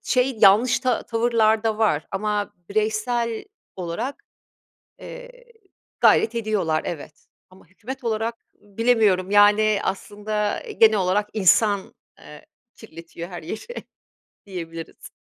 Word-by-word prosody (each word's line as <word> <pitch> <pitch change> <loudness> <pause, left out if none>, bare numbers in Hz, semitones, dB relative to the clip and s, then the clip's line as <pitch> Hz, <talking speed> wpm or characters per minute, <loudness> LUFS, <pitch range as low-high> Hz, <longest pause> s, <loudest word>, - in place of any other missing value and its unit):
şey, 255 -2 0
yanlış 210 +5 +6
ta 255 -2 0
tavırlar 225 -2 +1
da 220 -1 0
var 180 -9 +1
ama 205 +1 -2 0.2
bireysel 220 +2 -1 0.3
olarak, 190 +10 -5 0.8
eee, - - -10 0.7
gayret 230 +1 +4
ediyorlar, 200 -8 0
evet, 155 -2 -8 0.2
ama 185 +1 -19
hükümet 255 +8 -9
olarak 230 0 -3
bilemiyorum, 205 -3 +1
yani, 205 0 +5
aslında 210 - -3 0.2
genel 220 -1 +6
olarak 195 +3 0
insan, 205 0 +2 0.2
eee, 150 0 -14 0.3
kirletiyor 170 -3 -10
her 175 -3 -8
yeri, 220 - -7 0.6
diyebiliriz. 165 -4 -8
210 Hz, 105 wpm, -23 LUFS, 190-225 Hz, 0.8 s, yanlış